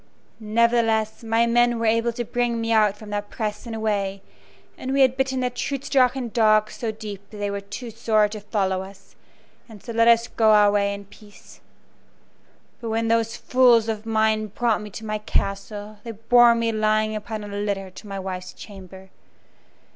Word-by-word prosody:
Nevertheless, 225 0 +1
my 225 +1 +2
men 240 0 +3
were 230 - -2
able 230 +1 +2
to 240 0 -4
bring 240 0 -1
me 225 0 -2
out 210 -2 +3
from 210 -1 -11
that 205 0 -3
press 210 0 -4
and 225 - -5
away, 200 -3 -2 0.5
and 260 - -5
we 275 - +3
had 260 -1 +4
bitten 265 -1 -1
the 250 0 -1
Trutz 275 +2 -4
Drachen 255 -2 +2
dogs 215 -1 +3
so 230 -2 -3
deep 205 -2 -9
that 215 - -11
they 205 0 -2
were 200 0 -4
too 205 +4 -8
sore 215 -1 +2
to 215 0 -7
follow 195 -2 -1
us, 195 +1 -13 0.5
and 215 -3 -13
so 235 - -7
let 230 0 +3
us 235 0 +5
go 220 -1 +3
our 205 -1 +5
way 200 -1 +1
in 200 0 -7
peace. 205 +1 -17 1.2
But 230 - -5
when 225 0 -1
those 230 0 +1
fools 245 -3 +4
of 220 0 -4
mine 220 -1 +1
brought 225 +1 0
me 210 - -8
to 220 +3 -9
my 215 0 -2
castle 205 +1 -3
they 230 - -6
bore 235 +2 +5
me 230 0 0
lying 215 0 +1
upon 215 0 -5
a - - -7
litter 200 -2 -3
to 205 - -12
my 195 -1 -5
wife's 185 -1 -6
chamber. 190 -2 -12
220 Hz, 190 wpm, -23 LUFS, 205-230 Hz, 1.2 s, us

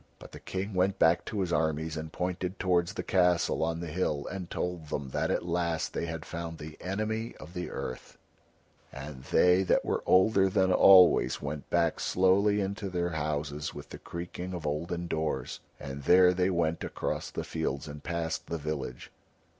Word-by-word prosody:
But - - -13
the - - -10
King 95 +2 -4
went 95 +1 +1
back 80 +1 +3
to 105 - -2
his 90 -2 -1
armies, 80 +1 0
and 80 0 -5
pointed 90 +1 -3
towards 90 -2 +1
the - - -4
castle 90 -3 +2
on 85 +1 -1
the - - -4
hill 75 -3 -1
and 95 -2 -6
told 90 -3 -3
them 70 -2 -3
that - - -1
at - - 0
last 85 -1 -1
they 85 - -2
had 80 -1 -5
found 85 -1 -6
the 75 0 -9
Enemy 110 +4 -3
of 80 +3 -11
the 90 -1 -4
Earth; 65 - -6 0.7
and 70 -1 -8
they 90 +5 +4
that 95 - +2
were - - 0
older 95 +1 +5
than 95 0 +2
always 90 -9 +7
went 75 0 -5
back 85 -2 +1
slowly 100 +3 +3
into 100 +1 -3
their 90 -1 -1
houses 75 -1 -3
with - - -9
the - - -9
creaking 90 +1 -6
of 85 -3 -6
olden 85 +4 -2
doors. 80 -6 -2 0.2
And 70 -1 -6
there 90 0 +6
they 90 +1 +1
went 85 -3 0
across - - -3
the - - -4
fields 75 -2 -3
and 75 0 -9
passed 85 -1 -3
the 85 - -3
village. 75 -5 -5
85 Hz, 185 wpm, -29 LUFS, 80-90 Hz, 0.7 s, always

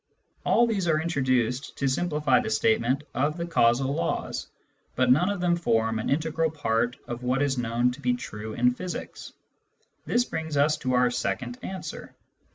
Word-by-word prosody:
All 240 - +4
these 205 -6 -1
are 155 -2 +3
introduced 130 -6 0
to 140 - 0
simplify 150 -2 +2
the - - -3
statement 115 +5 +2
of 150 +4 0
the 170 - -2
causal 130 -4 +2
laws, 85 - -2 0.5
but 130 0 +3
none 170 +9 +4
of 200 -3 -2
them 175 -1 +3
form 115 -9 +1
an 110 - -3
integral 160 +2 +1
part 120 -5 -1
of 120 0 -5
what 125 +3 +1
is 135 -3 0
known 120 +1 +1
to 130 +4 -10
be 125 -2 +1
true 110 -2 -7
in 125 +2 +3
physics. 180 +7 -6 0.8
This 245 0 +2
brings 160 -6 -4
us 150 +2 +4
to 130 -3 -2
our 125 0 +3
second 120 0 -3
answer. 190 -1 -7
130 Hz, 170 wpm, -26 LUFS, 120-160 Hz, 0.8 s, All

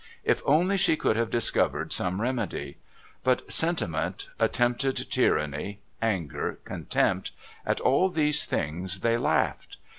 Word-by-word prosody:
If - - +2
only 175 +7 +4
she 165 -4 +3
could 110 - +1
have 115 0 0
discovered 115 0 +1
some 90 +2 -1
remedy! 120 -5 -2 0.5
But 130 -1 +1
sentiment, 170 - -1
attempted 125 +2 +2 0.2
tyranny, 75 +7 +1 0.2
anger, 95 -9 -1
contempt, - - 0 0.4
at - - +1
all 180 +8 +3
these 150 -3 +1
things 90 +5 -2
they 115 +2 +2
laughed. - - 0
120 Hz, 120 wpm, -27 LUFS, 95-150 Hz, 0.5 s, only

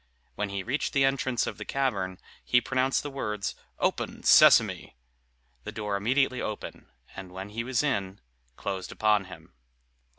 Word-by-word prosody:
When 105 0 -3
he 100 -1 -4
reached 135 +8 -2
the 135 -1 +4
entrance 130 -3 0
of - - -5
the - - -4
cavern, 100 -9 -1 0.3
he 125 - +4
pronounced 130 +1 0
the 145 - -5
words, 105 -7 -3 0.2
"Open, - - -2
Sesame!" - - +6 0.7
The - - -6
door 105 -2 -3
immediately 130 +5 +1
opened, 110 - -6 0.3
and 95 -1 -8
when 95 +2 -7
he 115 +3 -4
was 130 +2 0
in, 100 -9 -1 0.4
closed 95 +3 -4
upon 105 -2 +2
him. 95 - -13
110 Hz, 155 wpm, -28 LUFS, 100-130 Hz, 0.7 s, Sesame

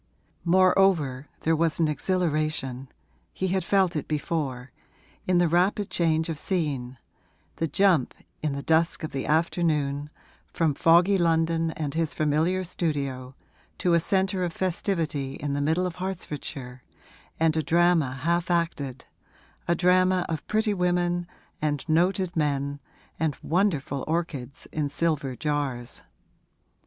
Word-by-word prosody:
Moreover 175 -6 +3
there 165 0 +2
was 165 0 0
an 165 - +3
exhilaration 150 -4 -1 0.4
(he 190 - -2
had 190 +1 0
felt 190 -4 +2
it 150 - -3
before) 140 -5 -3 0.6
in 180 -1 +3
the 175 0 +4
rapid 185 +5 +1
change 160 -2 +1
of 160 -3 -3
scene 140 -9 -2 0.6
the 165 - 0
jump, 175 -4 +2 0.3
in 150 -2 -1
the 140 0 -4
dusk 165 +2 +2
of 155 - -4
the 135 - -3
afternoon, 150 -3 +1 0.4
from 160 -3 +1
foggy 175 +6 +4
London 165 -1 +2
and 145 -3 -3
his 160 -1 -1
familiar 160 +5 +1
studio 140 -7 -3 0.4
to 175 - +1
a 170 - +5
centre 190 +1 0
of 175 -2 -2
festivity 165 -7 -2
in 145 -1 -3
the 145 - -1
middle 160 +5 +1
of 180 -2 -4
Hertfordshire 150 -8 -5 0.6
and 160 -1 +3
a 160 - +2
drama 170 -2 +3
half 170 +6 -1
acted, 145 -7 -1 0.6
a 170 - +3
drama 185 +1 +3
of 160 -2 -4
pretty 215 0 +1
women 175 -1 0 0.3
and 150 0 -1
noted 180 +3 +1
men 145 -2 -1 0.4
and 155 -3 0
wonderful 155 -6 0
orchids 155 -5 -3
in 150 -2 -1
silver 145 -5 -1
jars. 140 -4 -3
160 Hz, 135 wpm, -26 LUFS, 145-175 Hz, 0.6 s, a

